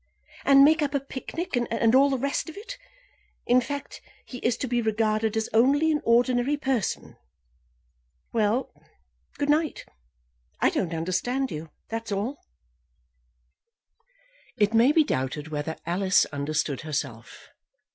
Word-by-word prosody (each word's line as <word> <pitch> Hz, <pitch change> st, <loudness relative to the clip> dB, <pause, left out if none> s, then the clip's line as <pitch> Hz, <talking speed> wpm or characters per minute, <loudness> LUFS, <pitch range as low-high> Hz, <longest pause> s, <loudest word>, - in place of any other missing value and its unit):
"And 275 Hz, 0 st, +7 dB
make 315 Hz, +2 st, +4 dB
up 285 Hz, -1 st, -1 dB
a -, -, +3 dB
picnic, 275 Hz, +5 st, -5 dB
and 230 Hz, -1 st, +1 dB
all 275 Hz, +2 st, +6 dB
the 270 Hz, -, 0 dB
rest 280 Hz, +5 st, -2 dB
of 320 Hz, -, -11 dB
it. 480 Hz, +4 st, -8 dB, 0.7 s
In 250 Hz, +1 st, +4 dB
fact, 285 Hz, +3 st, -6 dB, 0.2 s
he 250 Hz, -, -8 dB
is 235 Hz, 0 st, 0 dB
to 260 Hz, -, -3 dB
be 240 Hz, 0 st, 0 dB
regarded 220 Hz, 0 st, 0 dB
as 220 Hz, -, 0 dB
only 280 Hz, +8 st, +4 dB
an 300 Hz, -, 0 dB
ordinary 245 Hz, +4 st, +2 dB
person. 265 Hz, -7 st, -2 dB, 1.2 s
Well; 225 Hz, +3 st, 0 dB, 0.6 s
good 290 Hz, 0 st, -1 dB
night. 310 Hz, +1 st, 0 dB, 0.7 s
I -, -, +3 dB
don't 170 Hz, -3 st, -2 dB
understand 245 Hz, +11 st, -1 dB
you, 155 Hz, +1 st, -6 dB, 0.2 s
that's 225 Hz, -1 st, -5 dB
all." 215 Hz, +8 st, -3 dB, 2.1 s
It 205 Hz, +1 st, +2 dB
may 235 Hz, +5 st, +5 dB
be 315 Hz, +1 st, +5 dB
doubted 145 Hz, -, -3 dB
whether 155 Hz, +1 st, -3 dB
Alice 185 Hz, +3 st, +2 dB
understood 145 Hz, -1 st, -2 dB
herself. 140 Hz, -7 st, -6 dB
235 Hz, 135 wpm, -26 LUFS, 195-275 Hz, 2.1 s, And